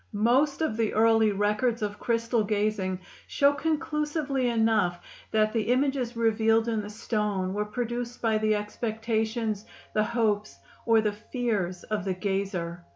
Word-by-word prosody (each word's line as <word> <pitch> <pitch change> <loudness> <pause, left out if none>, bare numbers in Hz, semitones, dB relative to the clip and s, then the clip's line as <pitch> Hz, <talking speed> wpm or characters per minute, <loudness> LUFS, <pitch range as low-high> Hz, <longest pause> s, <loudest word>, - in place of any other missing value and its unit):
Most 255 +8 +2
of 235 -9 0
the 225 -2 0
early 225 0 +4
records 210 +3 0
of 205 0 -3
crystal 230 -1 +1
gazing 205 -3 -1 0.3
show 280 0 +3
conclusively 300 -3 -1
enough 220 -6 +2 0.3
that 215 0 +2
the 225 - +1
images 255 -2 0
revealed 225 0 +3
in 225 -2 0
the 205 - -7
stone 210 -3 -2
were 210 +1 -1
produced 240 +2 -4
by 220 -2 +1
the 215 0 +2
expectations, 220 0 -2 0.3
the 215 - +3
hopes, 215 -3 0 0.3
or 225 -1 +5
the 210 -1 0
fears 210 -5 -2
of 215 -2 -2
the 190 -1 -1
gazer. 185 -3 -2
220 Hz, 145 wpm, -27 LUFS, 210-235 Hz, 0.3 s, or